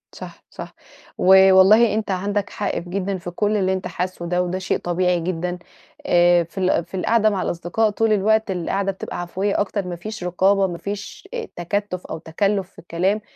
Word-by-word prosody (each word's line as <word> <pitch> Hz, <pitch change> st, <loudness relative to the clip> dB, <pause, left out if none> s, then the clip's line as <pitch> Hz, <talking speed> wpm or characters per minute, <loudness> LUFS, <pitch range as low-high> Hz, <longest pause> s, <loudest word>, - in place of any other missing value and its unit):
صح، -, -, -11 dB
صح، -, -, -9 dB, 0.4 s
ووالله 190 Hz, +4 st, +6 dB
أنت 215 Hz, -2 st, -2 dB
عندك 200 Hz, +2 st, -1 dB
حق 205 Hz, -, -3 dB
في 175 Hz, -, -10 dB
جدًا 195 Hz, +1 st, -2 dB
في 175 Hz, 0 st, -7 dB
كلّ 210 Hz, +3 st, 0 dB
اللي 190 Hz, -1 st, +1 dB
أنت 190 Hz, -, -3 dB
حاسُّه 180 Hz, -1 st, -4 dB
ده، 180 Hz, +1 st, 0 dB
وده 180 Hz, +1 st, -3 dB
شيء 185 Hz, -, -1 dB
طبيعي 180 Hz, 0 st, 0 dB
جدًا 180 Hz, +1 st, -3 dB, 0.5 s
آآ 175 Hz, 0 st, +4 dB
في 170 Hz, -, -19 dB
ال 185 Hz, -3 st, +1 dB
في 190 Hz, -, -7 dB
القعدة 220 Hz, +3 st, +3 dB
مع 195 Hz, -3 st, -2 dB
الأصدقاء 175 Hz, +6 st, 0 dB
طول 220 Hz, +1 st, +1 dB
الوقت، 215 Hz, +1 st, +2 dB
القعدة 195 Hz, +2 st, -1 dB
بتبقى 190 Hz, -, -6 dB
عفوية 190 Hz, +3 st, -2 dB
أكتر، 200 Hz, -2 st, -2 dB
ما 175 Hz, -, -4 dB
فيش 215 Hz, +3 st, -7 dB
رقابة، 190 Hz, +2 st, +2 dB
ما 175 Hz, -, -5 dB
فيش 200 Hz, +3 st, -7 dB
إ 480 Hz, -2 st, -3 dB
تكتُّف 180 Hz, +1 st, -3 dB
أو -, -, -5 dB
تكلُّف 195 Hz, +4 st, -1 dB
في -, -, -17 dB
الكلام، 185 Hz, +5 st, -1 dB
190 Hz, 190 wpm, -21 LUFS, 175-205 Hz, 0.5 s, ووالله